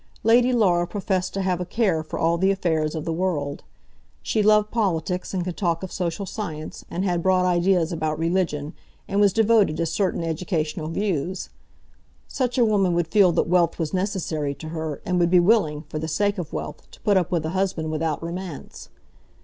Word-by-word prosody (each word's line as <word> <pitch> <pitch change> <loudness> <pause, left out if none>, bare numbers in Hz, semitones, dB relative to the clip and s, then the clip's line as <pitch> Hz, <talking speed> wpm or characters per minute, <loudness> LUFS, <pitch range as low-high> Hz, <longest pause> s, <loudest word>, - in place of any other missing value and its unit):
Lady 240 +3 +5
Laura 180 -8 +3
professed 190 -2 -2
to 195 - -2
have 180 -1 0
a - - 0
care 185 -3 0
for 155 - -6
all 165 +1 +2
the 190 +2 +3
affairs 160 -5 0
of 155 - -4
the 165 - -1
world. 160 -5 -2 0.6
She 215 - +1
loved 210 0 +4
politics, 180 -5 -1
and 185 -2 -1
could 180 -1 -4
talk 170 -3 0
of 190 - -5
social 180 +2 -3
science, 160 -7 -6
and 185 +3 -2
had 175 -2 0
broad 185 0 +3
ideas 175 -1 +2
about 155 -2 -2
religion, 165 -2 -1 0.3
and 200 +1 +1
was 200 -1 +5
devoted 220 -6 +3
to 170 - 0
certain 170 +2 -1
educational 160 -2 -2
views. 185 0 -2 0.8
Such 255 -1 -2
a 240 - +5
woman 195 -5 +2
would 170 -1 0
feel 200 -3 +5
that 165 - +1
wealth 175 -1 +2
was 160 -3 -3
necessary 175 -7 -2
to 155 +3 -8
her, 160 -2 -5
and 180 0 0
would 170 -1 +3
be 180 0 +6
willing, 175 -6 +2
for 155 0 -6
the 160 - -3
sake 200 +5 0
of 170 - -5
wealth, 150 - -6
to - - -17
put 205 - +2
up 180 -4 +2
with 165 -3 0
a - - -1
husband 180 -4 -1
without 155 0 -2
romance. 170 -1 -7
175 Hz, 200 wpm, -24 LUFS, 160-195 Hz, 0.8 s, be